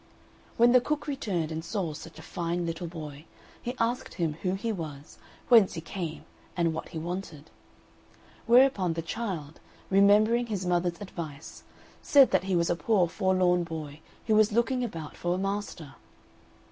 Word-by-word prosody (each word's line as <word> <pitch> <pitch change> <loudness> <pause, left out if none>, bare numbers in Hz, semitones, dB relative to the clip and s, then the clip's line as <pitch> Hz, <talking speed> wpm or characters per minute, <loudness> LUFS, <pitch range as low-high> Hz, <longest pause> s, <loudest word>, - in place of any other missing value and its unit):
When 235 +1 +6
the 250 0 +6
cook 300 +3 -2
returned 200 - -2
and 160 0 -4
saw 180 -5 -3
such 160 +2 -10
a - - -11
fine 170 0 -3
little 165 +1 -4
boy, 155 -3 -8 0.4
he 245 +2 -4
asked 235 +2 -1
him 165 -4 -1
who 185 0 0
he 225 +4 -2
was, 155 -7 -7 0.3
whence 225 -6 +6
he 165 - -4
came, 165 -2 -6 0.3
and 170 -2 +2
what 160 - -6
he 170 - -7
wanted; 165 -2 -6 1.0
whereupon, 235 -8 +5
the 165 0 -4
child, 170 -6 -5 0.3
remembering 210 +5 +5
his 200 -4 -3
mother's 175 -1 0
advice, 160 -6 -8 0.4
said 275 -2 +6
that 190 -1 +2
he 190 -1 0
was 170 0 +2
a - - +2
poor 190 0 +2
forlorn 185 -1 +2
boy 155 -3 -7 0.3
who 220 - +2
was 215 0 +5
looking 235 +3 +1
about 165 -10 -6
for 175 0 -1
a - - -2
master. 195 -7 -4
180 Hz, 165 wpm, -28 LUFS, 165-215 Hz, 1.0 s, When